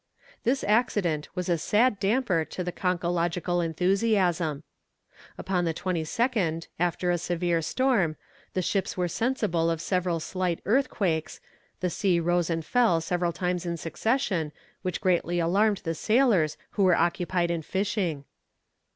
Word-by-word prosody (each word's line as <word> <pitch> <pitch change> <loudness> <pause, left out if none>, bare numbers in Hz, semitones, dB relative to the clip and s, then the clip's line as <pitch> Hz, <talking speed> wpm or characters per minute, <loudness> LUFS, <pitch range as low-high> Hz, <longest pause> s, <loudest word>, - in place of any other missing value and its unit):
This 265 +3 +1
accident 205 -8 +1
was 180 -1 -3
a 170 -2 +1
sad 210 +5 +2
damper 195 -4 +1
to 180 - -5
conchological 175 -1 -1
enthusiasm. 180 -3 +1 0.7
Upon 185 -2 -1
the 165 -1 -1
22nd, 180 0 -1
after 175 +1 +1
a 175 - 0
severe 175 0 0
storm, 200 - +1 0.4
the 185 - +1
ships 195 +1 -1
were 180 -1 +1
sensible 205 -6 0
of 165 -1 -1
several 180 -1 0
slight 180 +1 -2
earthquakes, 195 - 0 0.4
the 180 -1 0
sea 180 -1 +1
rose 175 0 +1
and 165 -1 -2
fell 235 -9 +3
several 175 +1 -1
times 180 0 -2
in 170 -1 -3
succession, 185 - -1 0.3
which 185 -1 -3
greatly 175 -2 +1
alarmed 200 +5 +2
the 165 - -1
sailors 215 - +2
who 200 - +1
were 180 -2 +5
occupied 175 0 +1
in 170 -1 -1
fishing. 190 -4 -1
180 Hz, 135 wpm, -27 LUFS, 165-200 Hz, 0.7 s, were